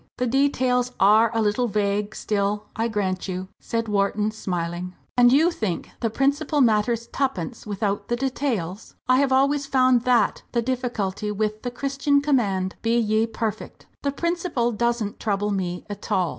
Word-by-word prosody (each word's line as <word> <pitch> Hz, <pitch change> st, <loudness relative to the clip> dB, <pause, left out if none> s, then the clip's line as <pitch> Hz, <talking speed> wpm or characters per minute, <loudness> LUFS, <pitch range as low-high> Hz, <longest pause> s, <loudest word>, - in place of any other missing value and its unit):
"The 250 Hz, -, 0 dB
details 250 Hz, -1 st, +1 dB
are 215 Hz, +4 st, +6 dB
a 225 Hz, -1 st, +1 dB
little 215 Hz, +4 st, +1 dB
vague 205 Hz, 0 st, -1 dB
still, 205 Hz, 0 st, -1 dB
I 225 Hz, +1 st, 0 dB
grant 195 Hz, -5 st, -2 dB
you," 185 Hz, 0 st, -4 dB
said 230 Hz, 0 st, -2 dB
Wharton, 210 Hz, +1 st, +1 dB
smiling. 180 Hz, -3 st, -4 dB, 0.2 s
"And 245 Hz, 0 st, +6 dB
you 315 Hz, +6 st, +5 dB
think 210 Hz, -, -3 dB
the 230 Hz, -, 0 dB
principle 285 Hz, +5 st, +1 dB
matters 230 Hz, -1 st, +2 dB
twopence 245 Hz, -, -3 dB
without 205 Hz, 0 st, -2 dB
the 240 Hz, -, 0 dB
details? 240 Hz, -7 st, -3 dB
I 255 Hz, 0 st, +5 dB
have 275 Hz, 0 st, +2 dB
always 280 Hz, +2 st, +2 dB
found 255 Hz, -3 st, +4 dB
that 250 Hz, -1 st, +3 dB
the 235 Hz, -, +2 dB
difficulty 225 Hz, -5 st, -2 dB
with 215 Hz, +1 st, -2 dB
the 245 Hz, -, -3 dB
Christian 275 Hz, +3 st, +1 dB
command, 205 Hz, -10 st, 0 dB
'Be 230 Hz, +1 st, +2 dB
ye 220 Hz, 0 st, +2 dB
perfect.' 225 Hz, -1 st, -5 dB, 0.2 s
The 280 Hz, -, 0 dB
principle 335 Hz, -6 st, -1 dB
doesn't 235 Hz, -2 st, -1 dB
trouble 205 Hz, -1 st, -1 dB
me 180 Hz, -3 st, -3 dB
at 205 Hz, -1 st, -8 dB
all!" 180 Hz, -3 st, +2 dB
225 Hz, 160 wpm, -24 LUFS, 205-255 Hz, 0.2 s, are